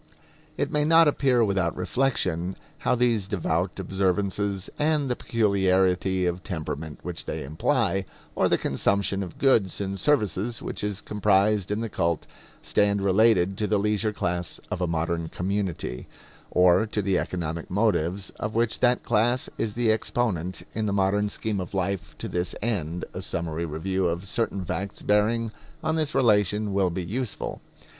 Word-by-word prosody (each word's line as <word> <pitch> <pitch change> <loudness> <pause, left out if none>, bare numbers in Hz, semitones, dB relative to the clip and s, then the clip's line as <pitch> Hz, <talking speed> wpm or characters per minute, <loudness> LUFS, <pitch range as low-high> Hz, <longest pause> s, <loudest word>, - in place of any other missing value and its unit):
It - - -1
may 150 0 +2
not 165 +1 +6
appear 130 -4 +3
without 95 -4 0
reflection 90 -5 0 0.2
how - - +2
these 115 -5 +1
devout 90 -1 -1
observances 95 +1 0
and 150 -3 +2
the - - +1
peculiarity 95 -4 +2
of 90 +1 -2
temperament 80 -4 -5
which 90 -1 -6
they - - -3
imply, 95 - 0 0.3
or - - +2
the - - +3
consumption 100 +7 0
of 90 -3 -6
goods 115 -9 +3
and 100 -1 -3
services 115 -5 +1
which - - -5
is 105 -1 -2
comprised 105 -1 +2
in 105 +2 -1
the 115 - -2
cult, 85 -5 -1 0.4
stand 100 -1 +2
related 95 -1 +3
to 105 - +1
the 105 - +2
leisure 105 +1 +1
class 90 -3 -3
of - - -2
a 90 - +1
modern 85 0 -1
community, 95 -9 -3 0.4
or 90 +4 +4
to 105 -1 -1
the 95 -2 +2
economic 85 -2 -4
motives 100 -2 0
of 110 +1 -3
which 115 -1 +1
that 125 0 +3
class 120 +3 +1
is 110 -2 -1
the 115 -1 +2
exponent 95 -6 -1
in 110 0 -1
the 100 - 0
modern 100 +1 +2
scheme 105 -1 -2
of 90 +2 -6
life 95 0 -2
to - - -5
this 90 0 -2
end 90 -7 -1
a - - -5
summary 85 0 -3
review 90 +4 -1
of 85 +3 -2
certain 100 -2 -1
facts 95 +3 -4
bearing 110 +2 +2 0.3
on 160 0 +1
this 155 -2 -1
relation 105 -3 +3
will 95 -2 +2
be 90 +1 -3
useful. 120 +5 -4
100 Hz, 160 wpm, -26 LUFS, 90-110 Hz, 0.4 s, not